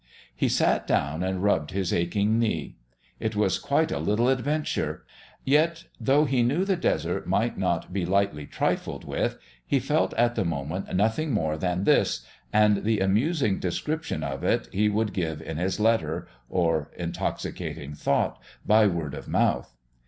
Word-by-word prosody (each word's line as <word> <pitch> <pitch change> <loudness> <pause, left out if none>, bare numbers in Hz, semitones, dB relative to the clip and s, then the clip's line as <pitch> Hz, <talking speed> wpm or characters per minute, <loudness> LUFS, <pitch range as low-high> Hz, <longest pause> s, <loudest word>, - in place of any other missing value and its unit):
He - - +1
sat - - +2
down 75 +4 0
and 95 0 -1
rubbed 80 -7 +2
his 95 -2 -1
aching 100 +6 +1
knee. 105 -10 -1 0.4
It 110 -1 -2
was 105 -2 +1
quite 160 +3 +1
a - - -1
little 115 +5 +2
adventure. 145 +4 -1 0.4
Yet, 165 +5 +2 0.2
though 145 +3 +3
he 130 -3 +2
knew 145 +11 +2
the 195 -1 +2
Desert 175 - -1
might - - +1
not - - -1
be 95 -2 -1
lightly 95 -5 0
trifled - - -2
with, - - -1 0.3
he 140 - +1
felt 150 +5 0
at 120 0 +3
the - - 0
moment 80 +2 -3
nothing 110 +11 +1
more 80 -9 0
than 90 +3 -1
this - - +2 0.3
and 105 -1 +4
the 110 -1 +1
amusing 110 - +1
description 150 - -2
of 70 -1 -4
it - - +1
he 105 +2 +2
would 105 -1 0
give 80 -5 -2
in 80 - -6
his 95 +5 -1
letter, 90 -8 +1 0.2
or 80 -4 +1
intoxicating 80 -3 -4
thought - - 0 0.2
by 110 0 +5
word 85 -6 -2
of - - -7
mouth. - - 0
100 Hz, 160 wpm, -26 LUFS, 85-120 Hz, 0.4 s, by